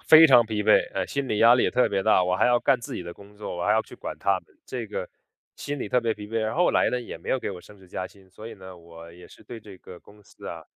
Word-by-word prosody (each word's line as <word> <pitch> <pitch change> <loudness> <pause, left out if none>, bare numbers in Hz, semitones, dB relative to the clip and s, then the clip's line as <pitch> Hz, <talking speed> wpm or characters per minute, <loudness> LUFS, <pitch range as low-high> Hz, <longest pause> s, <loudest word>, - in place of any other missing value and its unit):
非 160 +1 +8
常 120 -5 +6
疲 105 -1 -3
惫， 110 - +4
嗯， - - -1
心 140 -2 -3
理 105 - -1
压 115 +2 +7
力 125 - +2
也 - - +1
特 125 - +2
别 100 -1 -1
大， 95 - +4
我 90 0 0
还 - - +3
要 120 0 +3
干 130 - +2
自 115 - -7
己 - - -5
的 85 0 -8
工 100 +2 -17
作， 105 -3 -6
我 85 - -3
还 105 - +3
要 110 +1 +2
去 - - -14
管 - - -7
他 100 -1 +1
们， - - -29
这 120 -3 -6
个 100 -3 -5 0.5
心 145 0 -5
理 105 - -5
特 125 - +2
别 115 -2 -1
疲 105 0 -9
惫。 115 +2 -3
然 110 0 -2
后 175 +4 +2
后 - - +3
来 - - +2
呢， 125 - -2
也 120 - -8
没 - - -12
有 130 - +1
给 - - -4
我 90 -3 -8
升 105 - -17
职 95 - -18
加 90 - -5
薪， 95 -2 -20
所 105 +4 -11
以 115 - -10
呢， 95 -2 -12
我 85 0 -14
也 90 +1 -14
是 - - -17
对 115 -2 -10
这 100 -3 -13
个 90 - -13
公 105 0 -19
司 - - -15
啊 - - -7
105 Hz, 350 characters per minute, -25 LUFS, 95-120 Hz, 0.5 s, 非